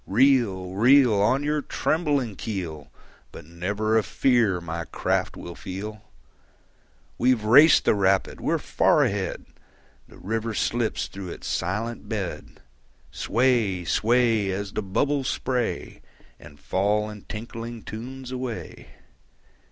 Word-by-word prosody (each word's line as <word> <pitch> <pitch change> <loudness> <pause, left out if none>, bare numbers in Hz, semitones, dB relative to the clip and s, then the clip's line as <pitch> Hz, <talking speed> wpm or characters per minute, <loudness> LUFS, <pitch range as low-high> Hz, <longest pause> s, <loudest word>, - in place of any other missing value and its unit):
Reel, 110 -6 +2
reel. 125 +4 +5
On 130 +7 +2
your 150 0 0
trembling 145 - -1
keel, 85 -10 -5 0.4
But - - -11
never 100 +7 0
a - - -1
fear 115 -9 +2
my 85 0 -5
craft - - -1
will 85 - -8
feel. 105 +5 -7 1.2
We've 125 -3 +2
raced 140 +9 +7
the - - +4
rapid, 95 -1 +1
we're - - +1
far - - +2
ahead! 95 -2 -2 0.6
The - - -16
river 110 +2 -3
slips 115 0 0
through 95 -2 -8
its - - -9
silent 105 +7 -3
bed. 100 -6 -5 0.5
Sway, 115 -7 +1
sway, 115 0 +2
As 100 +1 -4
the - - -1
bubbles 135 +8 0
spray 125 -3 -2 0.4
And 75 - -14
fall 105 +3 0
in 105 -1 -9
tinkling 115 +1 -7
tunes 125 +4 -8
away. 125 -3 -6
110 Hz, 120 wpm, -25 LUFS, 95-125 Hz, 1.2 s, raced